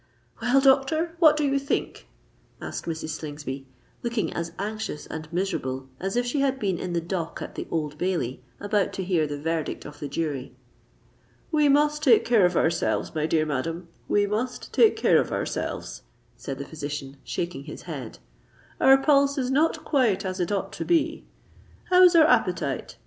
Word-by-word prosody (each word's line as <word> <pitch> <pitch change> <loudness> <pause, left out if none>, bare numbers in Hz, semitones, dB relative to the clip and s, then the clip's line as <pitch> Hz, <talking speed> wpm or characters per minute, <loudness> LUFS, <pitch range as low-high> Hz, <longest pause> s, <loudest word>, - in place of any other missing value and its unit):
"Well, 245 +3 +4
doctor—what 310 +4 +4
do 300 - +1
you 275 -1 +2
think?" 275 - -3 0.5
asked - - -6
Mrs. 160 -1 -4
Slingsby, 145 -3 -6 0.3
looking 235 -2 -2
as 170 0 -3
anxious 210 -6 -4
and 155 0 -7
miserable 135 -8 -2
as 195 +4 -3
if 245 0 +1
she 245 +4 -1
had 275 -1 +1
been 195 -8 -1
in 180 -1 -4
the 170 - +1
dock 170 0 -4
at - - -7
the - - -6
Old 150 -2 -3
Bailey, 170 -10 -1 0.2
about 205 -1 0
to 190 - -3
hear 175 -4 +1
the 145 0 -4
verdict 160 0 -3
of 145 0 -10
the 145 - -4
jury. 140 -3 -3 1.0
"We 300 -2 +4
must 295 +1 +3
take 255 -7 +5
care 220 -6 +5
of 180 - -2
ourselves, 165 +1 0
my 155 -1 0
dear 155 -1 +2
madam—we 165 +7 -2
must 220 +5 -3
take 450 - +5
care - - +4
of - - -5
ourselves," - - -3 0.3
said 135 -1 -6
the 140 - -6
physician, 145 -3 -6
shaking 170 -5 -4
his 150 - -9
head: - - -7 0.6
"our 270 0 +7
pulse 280 0 +3
is 255 -1 -1
not 305 +4 +1
quite 240 - +2
as 185 0 -3
it 175 +1 -1
ought 195 -1 -2
to - - -4
be. 325 -2 +1 0.7
How 365 0 +7
is 360 -1 +7
our 320 -2 +8
appetite? - - 0
190 Hz, 175 wpm, -25 LUFS, -, 1.0 s, our